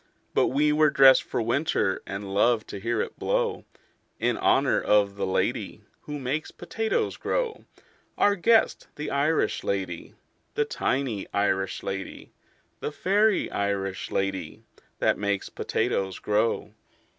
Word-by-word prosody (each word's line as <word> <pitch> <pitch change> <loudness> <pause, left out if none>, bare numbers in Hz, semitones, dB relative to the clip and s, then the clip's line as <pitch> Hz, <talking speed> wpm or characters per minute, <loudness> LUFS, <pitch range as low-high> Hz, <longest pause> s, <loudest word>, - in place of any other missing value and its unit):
But - - +3
we 150 +3 +2
were 155 0 +4
dressed 135 -1 +7
for - - -3
winter, 115 -5 0
And 95 0 -5
loved 110 +2 +2
to 100 - -6
hear 115 +2 -1
it - - -9
blow - - -1 0.5
In - - +1
honor - - +2
of 100 -1 +3
the 100 -1 -2
lady 95 - -1 0.2
Who 150 0 -5
makes 140 +3 -3
potatoes 225 0 -2
grow 485 -3 -2 0.5
Our 205 - +4
guest, 225 +4 +3
the 150 - -5
Irish 150 +3 +1
lady, 95 -4 -3 0.4
The - - +2
tiny 125 -7 -2
Irish 95 -2 0
lady, 95 0 -6 0.5
The - - -3
fairy 205 +6 +2
Irish 100 -1 -2
lady 95 -4 -3 0.3
That - - +1
makes 100 -1 -1
potatoes 95 -1 -1
grow. 105 +2 0
110 Hz, 135 wpm, -26 LUFS, 100-150 Hz, 0.5 s, dressed